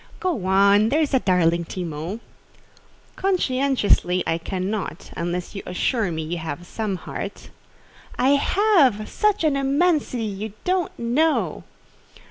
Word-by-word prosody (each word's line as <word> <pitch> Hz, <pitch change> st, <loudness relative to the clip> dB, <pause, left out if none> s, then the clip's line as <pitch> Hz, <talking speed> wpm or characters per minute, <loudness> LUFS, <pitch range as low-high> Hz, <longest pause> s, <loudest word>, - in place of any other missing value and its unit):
'" -, -, -20 dB
"Go 345 Hz, -, -2 dB
on, 200 Hz, +3 st, +5 dB
there's 300 Hz, +2 st, +1 dB
a 265 Hz, -, +5 dB
darling 170 Hz, -4 st, +2 dB
Timon." 170 Hz, +4 st, -5 dB, 0.9 s
"Conscientiously, 265 Hz, -, +1 dB
I 165 Hz, -, 0 dB
cannot, 190 Hz, +4 st, -4 dB
unless 175 Hz, +1 st, -3 dB
you 195 Hz, -, -5 dB
assure 210 Hz, +3 st, 0 dB
me 160 Hz, -1 st, -3 dB
you 170 Hz, +2 st, -4 dB
have 160 Hz, +1 st, -6 dB
some 210 Hz, +1 st, -3 dB
heart." -, -, -7 dB, 0.7 s
"I 260 Hz, -, +3 dB
have—such 340 Hz, -, +2 dB
an 305 Hz, -3 st, +2 dB
immensity, 275 Hz, -2 st, +1 dB
you 210 Hz, 0 st, -5 dB
don't 365 Hz, -2 st, 0 dB
know!" 290 Hz, +7 st, 0 dB
215 Hz, 120 wpm, -23 LUFS, 180-285 Hz, 0.9 s, on